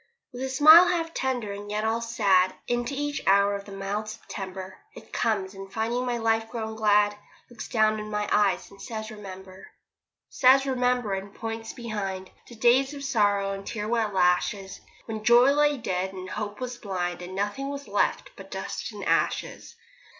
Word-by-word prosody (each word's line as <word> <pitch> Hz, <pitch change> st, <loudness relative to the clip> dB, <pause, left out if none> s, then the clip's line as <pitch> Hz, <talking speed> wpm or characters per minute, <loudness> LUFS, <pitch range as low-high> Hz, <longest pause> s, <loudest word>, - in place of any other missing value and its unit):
With 245 Hz, -, -7 dB
a 265 Hz, -, -2 dB
smile 310 Hz, +6 st, +8 dB
half 335 Hz, -2 st, -1 dB
tender, 245 Hz, -6 st, -2 dB
and 205 Hz, +1 st, -8 dB
yet 210 Hz, +1 st, -2 dB
all 225 Hz, +1 st, 0 dB
sad, 200 Hz, -5 st, +2 dB
Into 240 Hz, +3 st, -1 dB
each 290 Hz, 0 st, -2 dB
hour 200 Hz, +1 st, +5 dB
of 200 Hz, 0 st, -7 dB
the 205 Hz, -, -11 dB
mild 200 Hz, +2 st, -4 dB
September 190 Hz, -3 st, -8 dB, 0.2 s
It -, -, -14 dB
comes, 205 Hz, -4 st, 0 dB
and 195 Hz, 0 st, -10 dB
finding 235 Hz, +4 st, -1 dB
my 240 Hz, -1 st, 0 dB
life 225 Hz, -1 st, 0 dB
grown 220 Hz, -2 st, -5 dB
glad 210 Hz, -1 st, +3 dB, 0.4 s
Looks 240 Hz, -, -8 dB
down 215 Hz, -2 st, +2 dB
in 215 Hz, 0 st, -6 dB
my 210 Hz, 0 st, -2 dB
eyes, 205 Hz, -2 st, +2 dB
and 195 Hz, -, -15 dB
says 220 Hz, -2 st, -6 dB
'Remember.' 190 Hz, -2 st, -10 dB, 0.6 s
Says 270 Hz, +1 st, +5 dB
'Remember,' 250 Hz, -5 st, 0 dB
and 195 Hz, +1 st, -4 dB
points 225 Hz, 0 st, -5 dB
behind 195 Hz, -5 st, -5 dB, 0.2 s
To 240 Hz, -, -12 dB
days 255 Hz, +5 st, +3 dB
of 280 Hz, -, -8 dB
sorrow, 205 Hz, -6 st, +1 dB
and 195 Hz, 0 st, -5 dB
tear 210 Hz, -2 st, -4 dB
wet 225 Hz, -2 st, 0 dB
lashes; 190 Hz, +1 st, +1 dB, 0.2 s
When 220 Hz, -1 st, -5 dB
joy 240 Hz, +4 st, +6 dB
lay 295 Hz, 0 st, +3 dB
dead 190 Hz, -4 st, -2 dB
and 185 Hz, 0 st, -8 dB
hope 210 Hz, -1 st, -5 dB
was 250 Hz, -1 st, -5 dB
blind, 180 Hz, -5 st, -3 dB
And 180 Hz, +1 st, -7 dB
nothing 205 Hz, +8 st, -2 dB
was 280 Hz, 0 st, -6 dB
left -, -, 0 dB
but -, -, -12 dB
dust -, -, -5 dB
and -, -, -7 dB
ashes. -, -, -1 dB
215 Hz, 180 wpm, -26 LUFS, 195-245 Hz, 0.6 s, smile